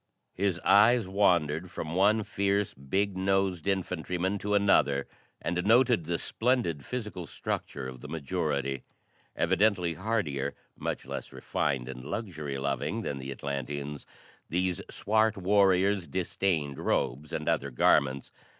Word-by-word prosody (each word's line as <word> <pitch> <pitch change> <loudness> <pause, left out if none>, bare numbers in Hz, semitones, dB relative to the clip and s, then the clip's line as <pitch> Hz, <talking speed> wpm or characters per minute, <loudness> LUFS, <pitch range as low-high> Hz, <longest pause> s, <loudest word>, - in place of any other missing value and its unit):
His 95 -2 0
eyes 110 +1 +6
wandered 90 -4 +2
from 80 -1 -5
one 105 +4 +4
fierce, 100 0 0
big 95 +9 -1
nosed 95 -2 0
infantryman 90 0 -1
to 105 +1 0
another 85 -9 +3 0.3
and 90 +1 -1
noted 115 -3 +4
the 85 +1 -1
splendid 115 - 0
physical 105 -8 -5
structure 65 -3 -4
of 65 -1 -9
the - - -8
majority. 70 -4 -2 0.5
Evidently 95 -1 +2
hardier, 90 -8 -1 0.2
much - - -4
less - - -6
refined 70 -4 -2
and 65 -1 -7
luxury 75 - -4
loving 70 0 -2
than 70 - -3
the 65 +1 -6
Atlanteans, 70 +1 -4 0.4
these 90 +2 0
swart 110 0 +1
warriors 95 -1 +3
disdained 85 -3 -1
robes 70 +5 -1
and - - -3
other 70 - +1
garments. 65 +1 +2
90 Hz, 125 wpm, -29 LUFS, 70-100 Hz, 0.5 s, eyes